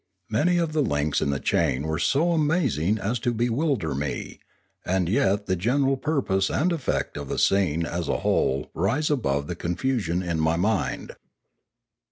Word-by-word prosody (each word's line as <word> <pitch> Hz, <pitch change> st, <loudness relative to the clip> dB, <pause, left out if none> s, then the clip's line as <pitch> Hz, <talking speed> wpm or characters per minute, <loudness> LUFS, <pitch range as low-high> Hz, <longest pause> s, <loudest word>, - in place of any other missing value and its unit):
Many 170 Hz, +11 st, +2 dB
of 165 Hz, -2 st, 0 dB
the 155 Hz, -, +2 dB
links 75 Hz, -, 0 dB
in -, -, 0 dB
the 70 Hz, -1 st, -1 dB
chain 65 Hz, 0 st, +1 dB
were 80 Hz, +1 st, -2 dB
so 160 Hz, -, +2 dB
amazing 145 Hz, -, +1 dB
as 110 Hz, +4 st, -2 dB
to 120 Hz, +1 st, 0 dB
bewilder 120 Hz, -, 0 dB
me, 70 Hz, +1 st, -4 dB, 0.4 s
and 95 Hz, -1 st, 0 dB
yet 100 Hz, +1 st, +1 dB
the 95 Hz, -, 0 dB
general 135 Hz, +9 st, +1 dB
pur 145 Hz, +1 st, -1 dB
pose 95 Hz, -1 st, +1 dB
and 175 Hz, +5 st, +1 dB
effect 150 Hz, -, -2 dB
of 70 Hz, -2 st, -6 dB
the -, -, -2 dB
scene 85 Hz, -4 st, +2 dB
as 85 Hz, -2 st, -3 dB
a -, -, 0 dB
whole 70 Hz, +2 st, +1 dB
rise 120 Hz, -, 0 dB
above 70 Hz, -, 0 dB
the 90 Hz, -, -4 dB
confusion 90 Hz, 0 st, -1 dB
in 85 Hz, -2 st, -2 dB
my 80 Hz, +1 st, +2 dB
mind. 100 Hz, +6 st, -1 dB
100 Hz, 175 wpm, -25 LUFS, 80-135 Hz, 0.4 s, Many